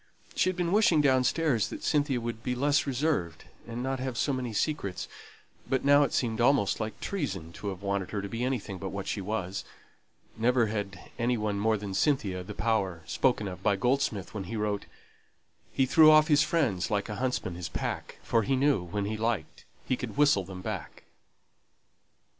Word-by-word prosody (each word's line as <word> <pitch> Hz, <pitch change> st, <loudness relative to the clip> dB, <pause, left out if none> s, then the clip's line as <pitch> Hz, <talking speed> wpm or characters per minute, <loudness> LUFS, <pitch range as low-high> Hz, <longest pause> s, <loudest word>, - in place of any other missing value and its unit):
She -, -, +2 dB
had 185 Hz, -, -2 dB
been 175 Hz, -1 st, 0 dB
wishing 200 Hz, -6 st, +4 dB
downstairs 130 Hz, -2 st, +2 dB
that -, -, -7 dB
Cynthia 145 Hz, -4 st, +1 dB
would 115 Hz, -1 st, -5 dB
be 125 Hz, +1 st, -2 dB
less 145 Hz, +3 st, +2 dB
reserved, 130 Hz, -, -1 dB, 0.2 s
and 120 Hz, +1 st, -4 dB
not 135 Hz, 0 st, -2 dB
have 130 Hz, -2 st, -3 dB
so 140 Hz, -, +1 dB
many 125 Hz, -2 st, -3 dB
secrets; 105 Hz, -, -2 dB, 0.6 s
but 130 Hz, 0 st, 0 dB
now 145 Hz, +1 st, +6 dB
it 145 Hz, -, +2 dB
seemed 115 Hz, -2 st, 0 dB
almost 125 Hz, -5 st, +3 dB
like 110 Hz, 0 st, -4 dB
treason 95 Hz, -, -3 dB
to 105 Hz, -, -7 dB
have 95 Hz, -1 st, -5 dB
wanted 100 Hz, -2 st, -1 dB
her 105 Hz, -, -3 dB
to 100 Hz, -, -4 dB
be 115 Hz, +4 st, -3 dB
anything 115 Hz, -7 st, -2 dB
but 95 Hz, -, -4 dB
what 100 Hz, 0 st, -5 dB
she 100 Hz, -, -2 dB
was. 100 Hz, -1 st, -3 dB, 0.7 s
Never 120 Hz, +1 st, +3 dB
had 105 Hz, -2 st, -5 dB
any 120 Hz, +1 st, +1 dB
one 105 Hz, -2 st, -1 dB
more 110 Hz, +1 st, +2 dB
than 100 Hz, -1 st, -6 dB
Cynthia 100 Hz, -7 st, +1 dB
the 105 Hz, +3 st, -8 dB
power 95 Hz, -8 st, 0 dB
spoken 120 Hz, -6 st, +1 dB
of 90 Hz, -1 st, -7 dB
by 100 Hz, -, +2 dB
Goldsmith 120 Hz, -3 st, 0 dB
when 100 Hz, -3 st, -4 dB
he 115 Hz, -, -5 dB
wrote 105 Hz, -1 st, -2 dB, 0.8 s
He 135 Hz, -, +2 dB
threw 155 Hz, +4 st, +7 dB
off 155 Hz, +1 st, +6 dB
his 145 Hz, -1 st, +5 dB
friends 135 Hz, -, +1 dB
like 105 Hz, -1 st, 0 dB
a 105 Hz, -, -5 dB
huntsman 125 Hz, -8 st, -1 dB
his 85 Hz, 0 st, -5 dB
pack, -, -, -4 dB
For 115 Hz, -, +2 dB
he 135 Hz, +5 st, +1 dB
knew 135 Hz, -5 st, +3 dB
when 95 Hz, +4 st, -3 dB
he 110 Hz, +1 st, -2 dB
liked 110 Hz, -7 st, -2 dB, 0.2 s
he 130 Hz, -, +1 dB
could 125 Hz, 0 st, -6 dB
whistle 145 Hz, -9 st, +4 dB
them 90 Hz, 0 st, -9 dB
back. -, -, -6 dB
115 Hz, 195 wpm, -29 LUFS, 100-135 Hz, 0.8 s, threw